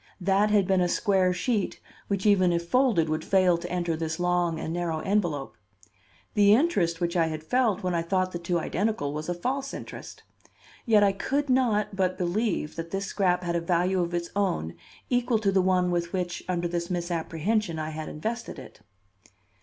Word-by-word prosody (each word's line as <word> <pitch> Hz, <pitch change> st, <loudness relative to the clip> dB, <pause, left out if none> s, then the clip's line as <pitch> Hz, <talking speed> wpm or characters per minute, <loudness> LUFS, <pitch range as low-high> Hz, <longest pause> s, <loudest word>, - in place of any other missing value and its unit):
That 195 Hz, +3 st, +2 dB
had 205 Hz, -2 st, +3 dB
been 190 Hz, -1 st, +2 dB
a 180 Hz, -, +2 dB
square 190 Hz, -2 st, +2 dB
sheet, 205 Hz, +3 st, -1 dB, 0.3 s
which 200 Hz, 0 st, -2 dB
even 190 Hz, -4 st, +4 dB
if 170 Hz, 0 st, -1 dB
folded 230 Hz, -7 st, +3 dB
would 155 Hz, 0 st, -2 dB
fail 185 Hz, -2 st, +3 dB
to 175 Hz, +1 st, -6 dB
enter 175 Hz, -2 st, -1 dB
this 160 Hz, 0 st, -3 dB
long 175 Hz, -2 st, +1 dB
and 160 Hz, -, -4 dB
narrow 170 Hz, -2 st, -2 dB
envelope. 175 Hz, -9 st, -1 dB, 0.8 s
The 205 Hz, 0 st, +6 dB
interest 195 Hz, -, +1 dB
which 170 Hz, +1 st, -1 dB
I 165 Hz, -2 st, +3 dB
had 155 Hz, -1 st, -5 dB
felt 215 Hz, +1 st, +1 dB
when 180 Hz, -1 st, 0 dB
I 170 Hz, -, +1 dB
thought 185 Hz, +2 st, 0 dB
the 175 Hz, -, -4 dB
two 175 Hz, 0 st, -1 dB
identical 170 Hz, -4 st, -1 dB
was 155 Hz, +2 st, -5 dB
a 175 Hz, -, -1 dB
false 270 Hz, +9 st, -3 dB
interest. -, -, -9 dB, 0.6 s
Yet 215 Hz, -2 st, +5 dB
I 200 Hz, -, +4 dB
could 275 Hz, +8 st, -1 dB
not 215 Hz, -6 st, +1 dB
but 185 Hz, -1 st, 0 dB
believe 180 Hz, -2 st, -1 dB
that 165 Hz, 0 st, -5 dB
this 195 Hz, +2 st, -3 dB
scrap 180 Hz, -2 st, +1 dB
had 170 Hz, -1 st, -1 dB
a 170 Hz, -, 0 dB
value 180 Hz, +2 st, +1 dB
of 175 Hz, 0 st, -2 dB
its 170 Hz, 0 st, -3 dB
own 85 Hz, -, 0 dB, 0.4 s
equal 245 Hz, -1 st, +2 dB
to 205 Hz, -2 st, +1 dB
the 190 Hz, -1 st, +3 dB
one 180 Hz, -1 st, +2 dB
with 170 Hz, -1 st, -2 dB
which, 180 Hz, -2 st, -3 dB
under 175 Hz, -1 st, 0 dB
this 170 Hz, 0 st, -3 dB
misapprehension, 175 Hz, +2 st, -1 dB
I 155 Hz, 0 st, -3 dB
had 155 Hz, 0 st, -6 dB
invested 225 Hz, +9 st, -5 dB
it. -, -, -12 dB
180 Hz, 195 wpm, -27 LUFS, 170-205 Hz, 0.8 s, The